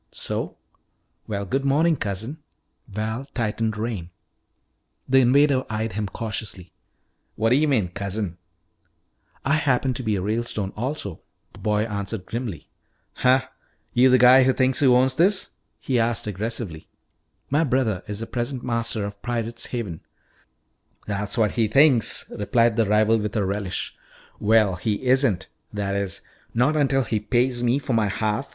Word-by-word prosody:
"So? - - -4 0.7
Well, 100 -2 -3
good 135 +8 -1
morning, 155 +4 +3
cousin." 110 +6 -4 0.5
Val 110 +5 -3
tightened 110 -2 -1
rein. 105 -6 -3 1.0
The 135 +1 +5
invader 130 +1 +4
eyed 110 -1 -2
him 105 +1 -2
cautiously. 100 -4 -5 0.6
"What 115 +1 +1
d'yuh 145 +5 +4
mean 110 -11 +1
cousin?" 100 -1 -4 1.1
"I 140 - +2
happen 135 -3 +1
to 125 - -4
be 110 -4 0
a 95 - -2
Ralestone 105 -2 -2
also," 115 - -4 0.3
the - - -14
boy 105 0 +1
answered 100 -2 -4
grimly. 115 -7 -5 0.5
"Huh? 130 +1 +3 0.5
You 125 +2 +5
the 130 - +6
guy 125 +2 +8
who 130 0 +4
thinks 130 0 +1
he 140 - +4
owns 130 +1 +4
this?" 185 +7 +2 0.3
he 125 -3 0
asked 115 -1 0
aggressively. 105 -5 -4 0.6
"My 150 +4 +3
brother 120 - +1
is 105 +1 -5
the - - -3
present 125 +2 -3
master 115 -3 -1
of 100 0 -8
Pirate's 115 -1 -3
Haven 105 -10 -4 0.5
" - - -40
"That's 105 +2 -3
what 110 -3 +3
he 115 -2 +1
thinks," 135 0 +4
replied 115 +2 +2
the 115 -2 +2
rival 110 +2 +3
with 105 0 -3
a 105 -3 +1
relish. 100 -1 -3 0.4
"Well, 105 -3 +3
he 105 +5 -2
isn't. 125 -7 +2 0.2
That 100 -1 -2
is, 100 -1 -2 0.3
not 125 +6 +3
until 135 -3 +2
he 110 -2 -1
pays 120 +3 0
me 120 +2 +2
for 140 -2 -3
my 110 -2 +2
half. 110 +6 -1
115 Hz, 155 wpm, -24 LUFS, 105-130 Hz, 1.1 s, guy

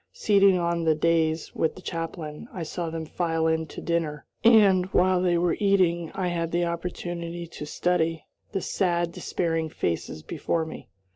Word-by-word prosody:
Seated 200 - +4
on 170 -1 0
the 160 -1 +3
dais 160 0 +1
with 160 - 0
the 185 - -11
chaplain, 165 +1 -5
I 175 - -5
saw 165 +1 -4
them 160 0 -4
file 165 0 -1
in 160 0 +1
to - - -8
dinner, 160 -4 -2 0.2
and, 200 -5 +6
while 185 -1 +3
they 175 -1 +2
were 170 0 +2
eating, 180 -5 +2
I 185 -2 -1
had 170 -1 -2
an 175 - +2
opportunity 170 0 -4
to 155 -3 -8
study 165 -1 0 0.3
the 195 - -2
sad, 175 -2 0
despairing 165 -2 -2
faces 80 - -3
before 165 0 -1
me. 160 - -9
170 Hz, 165 wpm, -26 LUFS, 160-180 Hz, 0.3 s, and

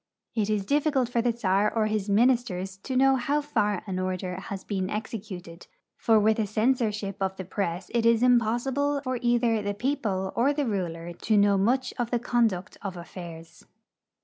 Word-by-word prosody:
It 215 -2 0
is 210 -2 0
difficult 280 -2 +1
for 240 -1 +1
the 240 0 +2
czar 210 -2 +1
or 225 -2 +1
his 215 -1 -1
ministers 205 -4 +2
to 255 +7 -5
know 270 +1 +5
how 280 +4 0
far 210 -10 0
an 185 -3 -3
order 185 0 -2
has 190 0 -6
been 190 -2 -2
executed, 200 -6 -6 0.3
for 225 -1 +3
with 220 +1 +3
a 215 - +1
censorship 215 -3 0
of 190 0 0
the 190 - -6
press 180 -1 -3
it 235 -1 +2
is 230 0 +4
impossible 250 +4 +2
for 255 -2 -2
either 240 -2 +2
the 205 0 -3
people 205 -6 -1
or 265 +5 +3
the 290 -1 -1
ruler 175 -6 -3
to 215 +5 0
know 200 0 +5
much 245 +7 +1
of 240 -1 0
the 240 - +1
conduct 225 -6 0
of 190 -3 -5
affairs. 170 -1 -10
215 Hz, 180 wpm, -27 LUFS, 190-245 Hz, 0.3 s, know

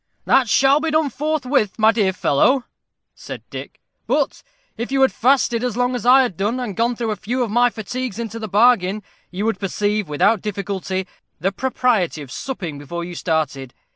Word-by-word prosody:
"That 255 -4 +3
shall 275 +5 +4
be 320 +1 -1
done 310 -2 +1
forthwith, 275 -6 0
my 220 0 +5
dear 205 -4 +1
fellow," 215 - +2 0.5
said - - -9
Dick. - - -8 0.3
"But - - 0 0.3
if 235 +3 -5
you 275 - +1
had 265 - +4
fasted 245 -2 +2
as 245 -2 -2
long 250 0 +1
as 245 -1 -3
I 265 +2 +7
have 240 -8 -3
done, 210 +8 -1
and 230 -6 -4
gone 235 +3 +1
through 230 -2 -2
a - - -1
few 245 +5 -2
of 225 - -4
my 240 +2 +4
fatigues 240 +1 -5
into 230 -1 -5
the 220 - -5
bargain, 210 -1 +3 0.3
you 190 +4 -3
would 225 -4 0
perceive, 205 -1 -1
without 200 +8 +2
difficulty, 195 -2 -3 0.3
the 195 - 0
propriety 215 - 0
of 130 - -12
supping 175 - -5
before 170 +4 -5
you 175 +1 -7
started. 150 -6 -2
220 Hz, 190 wpm, -20 LUFS, 190-250 Hz, 0.5 s, I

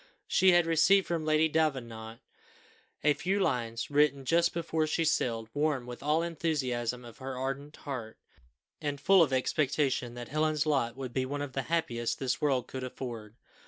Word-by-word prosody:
She 190 0 +4
had 175 -1 +5
received 180 +4 +4
from 165 -2 -2
Lady 155 +1 +3
Davenant 120 -8 -2 0.8
a 150 0 +5
few 190 +6 -1
lines, 115 -8 -1
written 140 -2 +3
just 170 +3 +3
before 160 -2 -1
she 165 +2 0
sailed, 115 -7 0
warm 145 -4 0
with 120 0 -8
all 150 +3 +2
the - - -1
enthusiasm 130 -8 -2
of 115 - -12
her 130 -1 -5
ardent 135 +3 -4
heart, 125 -6 -6 0.6
and 145 -1 -3
full 195 +3 +5
of 155 -5 +3
expectation 130 -2 0
that 120 -1 -7
Helen's 155 0 +1
lot 135 -6 0
would 130 -3 -6
be 130 -1 0
one 145 +1 -3
of 140 -2 -7
the 135 - -1
happiest 120 -9 -1
this 130 +1 -2
world 135 -5 +1
could 130 0 -6
afford. 115 -4 -7
140 Hz, 175 wpm, -30 LUFS, 125-155 Hz, 0.8 s, had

